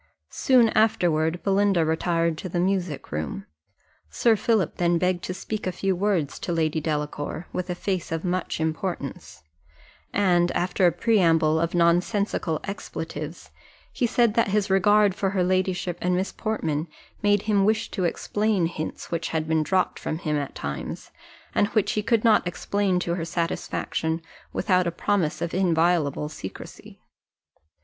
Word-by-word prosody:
Soon 250 Hz, -4 st, +4 dB
afterward 175 Hz, -7 st, +2 dB
Belinda 195 Hz, -3 st, +3 dB
retired 165 Hz, +1 st, +1 dB
to 185 Hz, -, -5 dB
the 175 Hz, -, -1 dB
music 180 Hz, -6 st, -1 dB
room. 80 Hz, +6 st, -4 dB, 0.6 s
Sir 230 Hz, -, +3 dB
Philip 210 Hz, -5 st, +1 dB
then 175 Hz, -1 st, +2 dB
begged 180 Hz, 0 st, 0 dB
to 185 Hz, -, -3 dB
speak 215 Hz, +1 st, -4 dB
a -, -, 0 dB
few 190 Hz, +1 st, -1 dB
words 180 Hz, -6 st, 0 dB
to -, -, -4 dB
Lady 160 Hz, -1 st, 0 dB
Delacour, 150 Hz, +1 st, -3 dB
with 180 Hz, 0 st, -3 dB
a 180 Hz, -, -1 dB
face 185 Hz, -2 st, -3 dB
of 165 Hz, +2 st, -2 dB
much 180 Hz, -2 st, -2 dB
importance: 160 Hz, -, -4 dB, 0.7 s
and 175 Hz, -3 st, +3 dB
after 180 Hz, +1 st, +2 dB
a -, -, +4 dB
preamble 165 Hz, -5 st, +3 dB
of 170 Hz, +1 st, -1 dB
nonsensical 175 Hz, 0 st, +1 dB
expletives, 160 Hz, -5 st, -6 dB, 0.4 s
he 245 Hz, -, +1 dB
said 235 Hz, -1 st, +3 dB
that 230 Hz, +1 st, +2 dB
his 205 Hz, 0 st, 0 dB
regard 205 Hz, +1 st, +4 dB
for 195 Hz, 0 st, -1 dB
her 190 Hz, -2 st, +1 dB
ladyship 185 Hz, -1 st, 0 dB
and 180 Hz, 0 st, +1 dB
Miss 190 Hz, +2 st, -1 dB
Portman 165 Hz, -8 st, -2 dB, 0.3 s
made 205 Hz, -1 st, +3 dB
him 205 Hz, -2 st, +2 dB
wish 220 Hz, +2 st, +1 dB
to 185 Hz, -4 st, -1 dB
explain 205 Hz, +2 st, 0 dB
hints 160 Hz, -2 st, -5 dB
which 165 Hz, -1 st, -1 dB
had 155 Hz, -1 st, -2 dB
been 160 Hz, 0 st, +2 dB
dropped 185 Hz, +5 st, 0 dB
from 155 Hz, -, -3 dB
him 155 Hz, -2 st, -2 dB
at 145 Hz, -2 st, -3 dB
times, 70 Hz, 0 st, -5 dB, 0.4 s
and 205 Hz, -, +3 dB
which 215 Hz, -1 st, +1 dB
he 210 Hz, -, 0 dB
could 230 Hz, 0 st, +1 dB
not 220 Hz, -5 st, +4 dB
explain 195 Hz, +1 st, 0 dB
to 170 Hz, -, -1 dB
her 170 Hz, -1 st, -2 dB
satisfaction, 165 Hz, -1 st, -2 dB, 0.3 s
without 185 Hz, -3 st, +1 dB
a -, -, 0 dB
promise 170 Hz, -2 st, 0 dB
of 170 Hz, -, -3 dB
inviolable 165 Hz, -5 st, +2 dB
secresy. 150 Hz, -11 st, -10 dB
180 Hz, 155 wpm, -25 LUFS, 160-200 Hz, 0.7 s, Soon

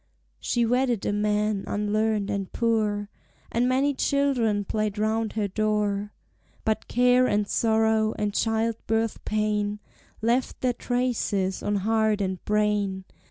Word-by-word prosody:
She 240 Hz, -1 st, 0 dB
wedded 245 Hz, -2 st, +1 dB
a -, -, 0 dB
man 210 Hz, -1 st, 0 dB
unlearned 210 Hz, 0 st, 0 dB
and 200 Hz, -2 st, -3 dB
poor, 215 Hz, -3 st, 0 dB, 0.4 s
And 245 Hz, +2 st, +1 dB
many 275 Hz, +3 st, +2 dB
children 255 Hz, -8 st, +1 dB
played 215 Hz, 0 st, -2 dB
round 220 Hz, +1 st, 0 dB
her 215 Hz, -2 st, -1 dB
door. 210 Hz, 0 st, -1 dB, 0.5 s
But 220 Hz, 0 st, 0 dB
care 250 Hz, +1 st, +4 dB
and 205 Hz, -2 st, +1 dB
sorrow, 220 Hz, -1 st, +2 dB
and 210 Hz, -1 st, -1 dB
child 225 Hz, +1 st, 0 dB
birth 225 Hz, 0 st, 0 dB
pain, 210 Hz, -1 st, 0 dB, 0.4 s
Left 240 Hz, +3 st, 0 dB
their 250 Hz, -1 st, +1 dB
traces 235 Hz, -6 st, -1 dB
on 205 Hz, -, -1 dB
heart 220 Hz, +1 st, +1 dB
and 190 Hz, -2 st, -2 dB
brain. 210 Hz, -2 st, 0 dB
215 Hz, 130 wpm, -26 LUFS, 205-230 Hz, 0.5 s, care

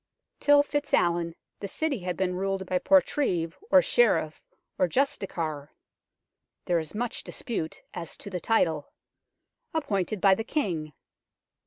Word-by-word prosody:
Till 290 Hz, 0 st, +6 dB
FitzAlwin 175 Hz, -, 0 dB, 0.2 s
the 200 Hz, -, -4 dB
City 290 Hz, +3 st, -1 dB
had 180 Hz, -2 st, -3 dB
been 185 Hz, -1 st, 0 dB
ruled 195 Hz, +1 st, -2 dB
by 180 Hz, 0 st, 0 dB
portreeve, 265 Hz, -, +2 dB
or -, -, +7 dB
sheriff, 485 Hz, -, +2 dB, 0.4 s
or 185 Hz, -, +4 dB
justiciar 165 Hz, -, -1 dB, 1.0 s
(there 175 Hz, -1 st, +2 dB
is 160 Hz, +4 st, -7 dB
much 240 Hz, +2 st, -3 dB
dispute 215 Hz, -10 st, -5 dB
as 170 Hz, -3 st, -6 dB
to 200 Hz, -, -8 dB
the 180 Hz, -, -2 dB
title) 165 Hz, -9 st, +1 dB, 0.8 s
appointed 215 Hz, -, -1 dB
by 195 Hz, +1 st, +6 dB
the 225 Hz, -, -1 dB
King. 175 Hz, -, -2 dB
190 Hz, 130 wpm, -27 LUFS, 170-260 Hz, 1.0 s, or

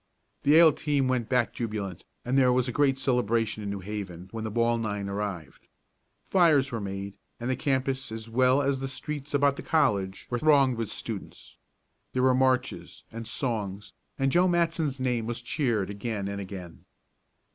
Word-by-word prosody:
The 145 Hz, -, +4 dB
Yale 160 Hz, -1 st, +8 dB
team 145 Hz, -3 st, 0 dB
went 125 Hz, -3 st, 0 dB
back 125 Hz, -2 st, +1 dB
jubilant, 105 Hz, -6 st, -4 dB, 0.2 s
and 125 Hz, +2 st, 0 dB
there 130 Hz, -2 st, +5 dB
was 125 Hz, 0 st, +2 dB
a -, -, -1 dB
great 135 Hz, +1 st, +2 dB
celebration 115 Hz, -4 st, 0 dB
in 100 Hz, -, -4 dB
New 100 Hz, -1 st, -4 dB
Haven 95 Hz, -3 st, -6 dB
when 115 Hz, -1 st, -5 dB
the 110 Hz, -, -2 dB
ball 115 Hz, +1 st, +1 dB
nine 105 Hz, -3 st, -3 dB
arrived. 100 Hz, -7 st, -5 dB, 0.6 s
Fires 155 Hz, -7 st, +3 dB
were 115 Hz, -2 st, -3 dB
made, 100 Hz, 0 st, -5 dB, 0.3 s
and 120 Hz, +2 st, -2 dB
the -, -, +1 dB
campus 130 Hz, -1 st, -1 dB
as 110 Hz, 0 st, -6 dB
well 130 Hz, +4 st, +3 dB
as 135 Hz, -1 st, 0 dB
the 135 Hz, -, -3 dB
streets 145 Hz, +2 st, -4 dB
about 140 Hz, 0 st, +3 dB
the -, -, -5 dB
college 100 Hz, -12 st, +1 dB
were 120 Hz, -, 0 dB
thronged 140 Hz, -4 st, +4 dB
with 115 Hz, -3 st, -2 dB
students. 105 Hz, -2 st, -6 dB, 0.6 s
There 130 Hz, -, +1 dB
were 130 Hz, 0 st, +5 dB
marches, 130 Hz, 0 st, 0 dB
and 115 Hz, 0 st, -6 dB
songs, 105 Hz, -4 st, -3 dB, 0.2 s
and 135 Hz, 0 st, +1 dB
Joe 180 Hz, +4 st, +4 dB
Matson's 165 Hz, -5 st, 0 dB
name 125 Hz, -3 st, -1 dB
was 120 Hz, -1 st, -2 dB
cheered 120 Hz, -, -1 dB
again 100 Hz, -1 st, -3 dB
and 100 Hz, 0 st, -4 dB
again. 95 Hz, -3 st, -9 dB
120 Hz, 180 wpm, -27 LUFS, 105-135 Hz, 0.6 s, Yale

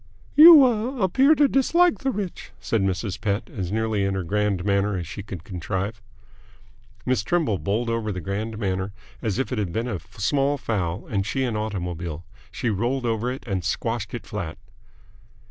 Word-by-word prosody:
"You 310 Hz, -2 st, +10 dB
ah 245 Hz, +2 st, 0 dB
appear 265 Hz, -, +5 dB
to 290 Hz, -1 st, +5 dB
dislike 335 Hz, +6 st, +3 dB
the 270 Hz, -, -1 dB
rich," 200 Hz, -7 st, -4 dB
said 115 Hz, -, 0 dB
Mrs. 95 Hz, 0 st, -2 dB
Pett, 105 Hz, +1 st, -1 dB
as 95 Hz, -5 st, -4 dB
nearly 110 Hz, -1 st, 0 dB
in 100 Hz, 0 st, 0 dB
her 95 Hz, -, -2 dB
grand 100 Hz, 0 st, 0 dB
manner 100 Hz, 0 st, +1 dB
as 90 Hz, -, -4 dB
she 95 Hz, +4 st, -7 dB
could 95 Hz, -4 st, -8 dB
contrive. 95 Hz, +4 st, -4 dB, 1.0 s
Miss 125 Hz, -5 st, +1 dB
Trimble 140 Hz, -, 0 dB
bowled 110 Hz, +4 st, -1 dB
over 115 Hz, -2 st, -1 dB
the 90 Hz, -, -4 dB
grand 105 Hz, +5 st, -4 dB
manner 95 Hz, -2 st, -2 dB, 0.3 s
as 110 Hz, -3 st, -1 dB
if 135 Hz, -, -2 dB
it 125 Hz, -, -1 dB
had 100 Hz, -5 st, -2 dB
been 115 Hz, +6 st, -2 dB
a 105 Hz, -7 st, -3 dB, 0.2 s
small 140 Hz, +7 st, +1 dB
fowl 100 Hz, -5 st, -2 dB
and 100 Hz, -4 st, -1 dB
she 120 Hz, +6 st, -1 dB
an 120 Hz, -4 st, -1 dB
automobile. 90 Hz, -6 st, -4 dB, 0.3 s
She 120 Hz, -, -1 dB
rolled 120 Hz, +6 st, -1 dB
over 115 Hz, +1 st, 0 dB
it 130 Hz, -, -7 dB
and 95 Hz, -6 st, -2 dB
squashed 115 Hz, +4 st, -2 dB
it 120 Hz, -, -7 dB
flat. 90 Hz, -7 st, -5 dB
105 Hz, 180 wpm, -24 LUFS, 95-125 Hz, 1.0 s, You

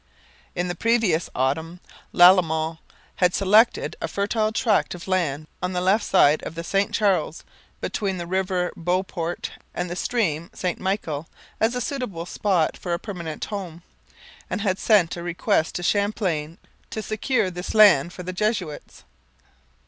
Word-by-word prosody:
In 175 Hz, +1 st, -1 dB
the 175 Hz, -, -2 dB
previous 215 Hz, -4 st, +1 dB
autumn 160 Hz, +7 st, -1 dB, 0.3 s
Lalemant 165 Hz, -3 st, +5 dB, 0.4 s
had 180 Hz, -1 st, +3 dB
selected 210 Hz, +4 st, +3 dB
a -, -, -1 dB
fertile 215 Hz, +2 st, 0 dB
tract 220 Hz, -4 st, +1 dB
of 175 Hz, -, -10 dB
land 160 Hz, -6 st, 0 dB, 0.2 s
on 180 Hz, +1 st, -2 dB
the 180 Hz, -, 0 dB
left 195 Hz, +4 st, +2 dB
side 155 Hz, -5 st, +4 dB
of 165 Hz, -, -7 dB
the 165 Hz, -, -5 dB
St 195 Hz, +4 st, 0 dB
Charles, 185 Hz, -6 st, 0 dB, 0.4 s
between 195 Hz, -4 st, -2 dB
the 175 Hz, -, -4 dB
river 185 Hz, 0 st, -1 dB
Beauport 175 Hz, 0 st, -2 dB, 0.2 s
and 180 Hz, -, -3 dB
the -, -, -3 dB
stream 175 Hz, -7 st, -1 dB
St 180 Hz, -1 st, -2 dB
Michel, 165 Hz, -6 st, -3 dB, 0.3 s
as 225 Hz, +3 st, +2 dB
a 250 Hz, -, -1 dB
suitable 230 Hz, -11 st, -4 dB
spot 180 Hz, -3 st, 0 dB
for 175 Hz, -, -3 dB
a -, -, +1 dB
permanent 170 Hz, -7 st, -6 dB
home, 180 Hz, -5 st, -6 dB, 0.7 s
and -, -, -2 dB
had 195 Hz, -3 st, 0 dB
sent 200 Hz, -7 st, +3 dB
a -, -, -5 dB
request 175 Hz, 0 st, 0 dB
to 175 Hz, -, -3 dB
Champlain 180 Hz, -6 st, 0 dB, 0.3 s
to 220 Hz, -, -5 dB
secure 215 Hz, -2 st, 0 dB
this 180 Hz, +3 st, -6 dB
land 185 Hz, -8 st, +6 dB
for 180 Hz, -, -8 dB
the 185 Hz, +1 st, -5 dB
Jesuits. 185 Hz, -6 st, -3 dB
180 Hz, 155 wpm, -24 LUFS, 170-205 Hz, 0.7 s, land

